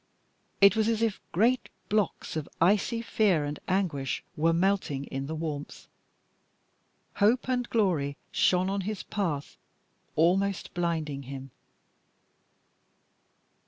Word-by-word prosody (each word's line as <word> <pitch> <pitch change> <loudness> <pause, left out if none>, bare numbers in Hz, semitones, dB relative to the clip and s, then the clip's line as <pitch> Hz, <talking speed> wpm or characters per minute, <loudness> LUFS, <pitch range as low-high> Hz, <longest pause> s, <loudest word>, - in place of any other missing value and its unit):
It 200 +2 +8
was 220 -1 +2
as 225 0 +1
if 225 -3 0
great 235 +7 +2 0.2
blocks 210 -6 -1
of 155 -2 -3
icy 210 +6 +2
fear 195 -10 +2
and 145 0 -4
anguish 170 -8 -1
were 165 +2 +3
melting 170 -5 +1
in 135 0 -5
the 160 - -3
warmth. 155 -2 -5 1.3
Hope 225 +6 +3
and 250 -1 0
glory 165 -11 +1
shone 185 0 +3
on 195 +1 -1
his 205 +1 -4
path, 165 -9 -3 0.6
almost 190 +4 +2
blinding 160 -5 -1
him. 135 -1 -7
180 Hz, 115 wpm, -28 LUFS, 150-210 Hz, 1.3 s, It